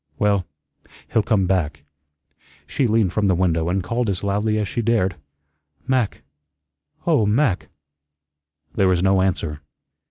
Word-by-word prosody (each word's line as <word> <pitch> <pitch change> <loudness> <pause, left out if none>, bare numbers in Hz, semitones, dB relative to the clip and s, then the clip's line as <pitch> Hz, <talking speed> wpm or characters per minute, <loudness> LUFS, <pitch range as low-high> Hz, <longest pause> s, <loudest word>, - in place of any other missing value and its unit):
well, 100 -4 +1 0.7
he'll 110 - +4
come 105 -2 +1
back." 80 -6 -1 0.8
She 120 - 0
leaned 110 -4 +2
from 105 -2 +1
the 95 - +3
window 85 -2 +1
and 95 +1 0
called 115 +3 -1
as 95 -1 -2
loudly 105 +2 0
as 105 -2 -1
she 120 - -2
dared, 110 -6 +1 0.7
"Mac, 130 -5 0 0.8
oh, 155 -10 +3
Mac." 110 -3 +1 1.1
There 95 - +2
was 90 -1 +2
no 95 0 +3
answer. 80 -5 -1
100 Hz, 135 wpm, -22 LUFS, 90-110 Hz, 1.1 s, he'll